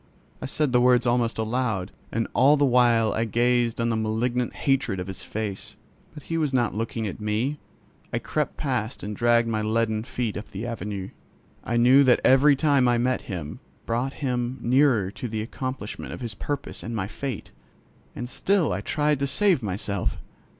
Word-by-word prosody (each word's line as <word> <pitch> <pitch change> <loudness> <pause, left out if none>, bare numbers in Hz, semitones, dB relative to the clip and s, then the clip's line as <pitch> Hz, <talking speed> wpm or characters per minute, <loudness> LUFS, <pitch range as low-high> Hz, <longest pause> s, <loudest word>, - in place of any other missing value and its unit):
I - - -3
said 150 +1 0
the 125 0 +4
words 125 -1 +4
almost 120 -1 +1
aloud, 110 -4 -1 0.2
and 115 0 -1
all 140 +4 +5
the 145 - +3
while 120 -3 +4
I 110 - 0
gazed 120 +1 +1
on 115 0 +1
the 115 - +1
malignant 115 +3 -1
hatred 135 -8 0
of 90 - -3
his 95 -1 -7
face. 105 0 -5 0.4
But 150 - -10
he 165 0 -2
was 145 -4 0
not 120 -3 +1
looking 115 +1 -3
at 100 - -5
me. 115 +8 -1 0.5
I - - 0
crept - - -2
past - - -2
and 105 +1 -4
dragged 120 +1 +3
my 110 -1 -1
leaden 110 0 0
feet 120 -2 -3
up 105 - -7
the 100 +4 -6
Avenue. 105 -4 -4 0.5
I 120 - -1
knew 125 +4 +6
that 125 -2 +5
every 140 +2 +6
time 140 -3 +3
I 120 -1 +3
met 125 +1 -1
him 85 -6 -5 0.3
brought 120 +4 -1
him 125 0 -1
nearer 120 -6 +3
to 125 - -6
the 110 -1 -3
accomplishment 130 -2 -5
of - - -8
his 115 -3 -4
purpose 145 +7 -5
and 115 +1 -5
my 100 -4 -1
fate. 125 +2 -6 0.6
And 120 - -5
still 185 - +1
I 95 - -2
tried 150 +5 0
to 140 - 0
save 180 +3 +2
myself. 100 -2 -2
120 Hz, 185 wpm, -25 LUFS, 110-130 Hz, 0.6 s, knew